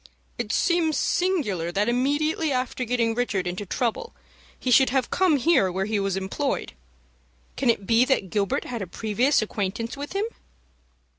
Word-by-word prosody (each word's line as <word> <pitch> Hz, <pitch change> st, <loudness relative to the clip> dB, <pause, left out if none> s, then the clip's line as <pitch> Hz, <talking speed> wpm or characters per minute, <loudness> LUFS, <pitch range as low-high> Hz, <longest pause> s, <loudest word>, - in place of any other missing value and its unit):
"It -, -, -2 dB
seems 335 Hz, -3 st, +2 dB
singular 250 Hz, -, 0 dB
that 205 Hz, +4 st, 0 dB
immediately 290 Hz, +5 st, +1 dB
after 255 Hz, 0 st, -2 dB
getting 230 Hz, -1 st, +1 dB
Richard 225 Hz, -6 st, -1 dB
into 180 Hz, +3 st, -4 dB
trouble, 245 Hz, -, -2 dB, 0.4 s
he 255 Hz, -, -1 dB
should 265 Hz, +2 st, +6 dB
have 265 Hz, 0 st, 0 dB
come 360 Hz, -5 st, +3 dB
here 260 Hz, -, +3 dB
where 190 Hz, +2 st, -1 dB
he 215 Hz, 0 st, -1 dB
was 195 Hz, -1 st, -1 dB
employed. 195 Hz, +9 st, -2 dB, 0.8 s
Can 260 Hz, -2 st, 0 dB
it 205 Hz, -4 st, +1 dB
be 230 Hz, +4 st, +4 dB
that 230 Hz, -9 st, 0 dB
Gilbert 200 Hz, -2 st, 0 dB
had 235 Hz, -3 st, -5 dB
a 190 Hz, -, -4 dB
previous 225 Hz, -, +1 dB
acquaintance 215 Hz, +2 st, -3 dB
with 285 Hz, +3 st, -7 dB
him?" 400 Hz, +2 st, 0 dB
240 Hz, 160 wpm, -25 LUFS, 200-285 Hz, 0.8 s, should